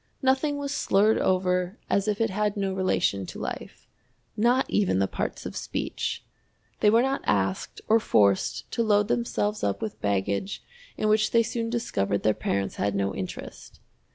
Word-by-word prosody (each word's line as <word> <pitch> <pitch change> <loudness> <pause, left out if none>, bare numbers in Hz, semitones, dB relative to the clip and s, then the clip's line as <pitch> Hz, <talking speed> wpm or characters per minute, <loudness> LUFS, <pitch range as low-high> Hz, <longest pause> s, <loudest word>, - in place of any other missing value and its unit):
Nothing 270 +3 +2
was 285 0 -3
slurred 210 -4 +3
over 180 +1 +1
as 200 +1 +1
if 210 -1 0
it 225 -2 +1
had 210 +1 0
no 195 -1 -1
relation 180 - 0
to - - -8
life - - -6 0.5
not 240 +4 +3
even 200 - +1
the 95 - +3
parts - - -4
of - - -6
speech! - - -3 0.5
They 210 - +5
were 230 +3 +5
not 270 +1 0
asked 95 -1 -1
or 225 +1 +5
forced 100 - +2
to - - 0
load 210 -1 +3
themselves 215 -3 -1
up 100 - 0
with 220 -2 -5
baggage 100 - -1 0.3
in 215 - 0
which 215 0 +3
they 230 0 +4
soon 230 0 -3
discovered 105 - -1
their 110 - +4
parents 100 -1 -2
had 100 0 0
no 100 0 0
interest. 95 - -7
205 Hz, 170 wpm, -26 LUFS, -, 0.5 s, They